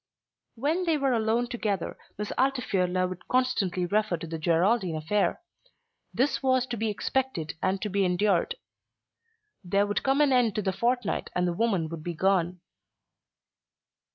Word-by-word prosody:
When 310 +9 0
they 325 -2 +2
were 275 -2 +1
alone 225 +1 +1
together 210 -7 -2 0.2
Miss 210 0 -4
Altifiorla 190 -9 +1
would 185 -1 -8
constantly 200 -9 +1
refer 205 -1 +1
to 165 - -7
the 165 0 -5
Geraldine 175 +3 +2
affair. 175 +7 0 0.7
This 270 +3 0
was 260 -2 +2
to - - 0
be 220 0 -1
expected 210 -7 -2
and 190 +1 +1
to 210 - -2
be 200 0 +1
endured. 180 0 +1 1.1
There 200 +3 +2
would 205 0 -1
come 270 +1 +2
an 285 -3 +4
end 240 -5 +3
to 210 - -1
the 190 -1 0
fortnight 240 +1 -1
and 180 0 +1
the 175 - 0
woman 190 -5 +1
would 165 -1 -6
be 175 0 -4
gone. 180 -1 +1
205 Hz, 155 wpm, -27 LUFS, 180-245 Hz, 1.1 s, an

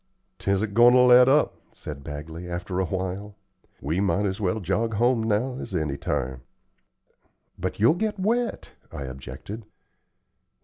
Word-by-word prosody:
"'Tisn't 100 +1 0
goin' 120 +3 +7
to 125 - +6
let 125 0 +7
up," 150 +3 +3
said 70 -2 -9
Bagley, 80 +4 -7
after 90 +1 -3
a 95 - +1
while. 95 +3 -4 0.5
"We 80 +6 -1
might 100 +1 +1
as 100 +2 -2
well 95 +2 0
jog 105 +4 -1
home 120 +2 +3
now 115 +4 0
as 95 - -6
any 75 -5 -1
time." 65 -2 -3 1.2
"But - - -3
you'll 115 +7 +5
get 210 +3 -2
wet," 230 +3 -1 0.2
I 70 - -6
objected. 65 - -8
100 Hz, 145 wpm, -25 LUFS, 85-120 Hz, 1.2 s, goin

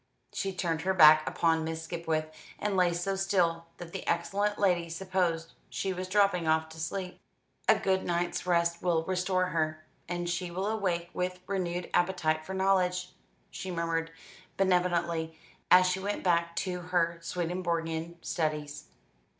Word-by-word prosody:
She 195 - -2
turned 170 -4 -2
her 190 +2 0
back 155 -2 +8
upon 165 -1 +1
Miss 160 0 -4
Skipwith, 160 -2 -2 0.2
and 205 -1 -1
lay 180 -2 +4
so 175 +3 -1
still 175 -4 +1
that 170 -1 -9
the - - -6
excellent 200 +5 0
lady 175 -4 +2
supposed 170 -2 -1 0.2
she 190 -1 -2
was 185 0 -5
dropping 195 -3 +2
off 160 0 +2
to 160 0 -11
sleep. 180 +3 -4 0.5
"A - - +7
good 190 -1 +1
night's 175 +1 -1
rest 170 -1 +2
will 170 -3 +1
restore 185 0 0
her, 155 -2 -1 0.2
and 175 0 -2
she 175 +1 -2
will 185 +3 -3
awake 185 -5 -1
with 180 0 -3
renewed 180 -2 -2
appetite 175 -4 +1
for 190 - -4
knowledge," 180 -1 +1 0.4
she 190 - -6
murmured 165 -2 -1 0.5
benevolently 170 -3 +1 0.3
as 185 0 +8
she 185 +1 +1
went 205 +2 -3
back 170 -1 +1
to 180 -1 -2
her 170 -1 0
Swedenborgian 170 -1 -2
studies. 150 -3 -2
175 Hz, 150 wpm, -30 LUFS, 165-185 Hz, 0.5 s, back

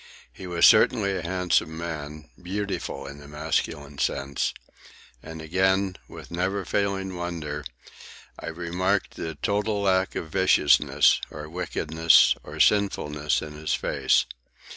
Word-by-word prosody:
He 95 - -9
was 85 -1 +3
certainly 100 -1 +5
a 90 - -3
handsome 85 -2 0
man—beautiful 80 +1 -5
in 70 +1 -9
the 70 - -12
masculine 75 -1 -3
sense. 70 0 -1 0.7
And 80 0 -9
again, 95 +3 +1
with - - -12
never 95 +3 -1
failing 95 -1 -1
wonder, 80 -4 -4 0.8
I - - -8
remarked 90 +4 -1
the 80 -1 -5
total 100 +5 -1
lack 95 -1 +1
of 80 - -5
viciousness, 95 -6 +4
or 75 0 -8
wickedness, 80 -1 +3
or - - -10
sinfulness 75 -9 +2
in 75 -1 -8
his 75 +1 -2
face. - - +1
85 Hz, 120 wpm, -25 LUFS, 75-95 Hz, 0.8 s, certainly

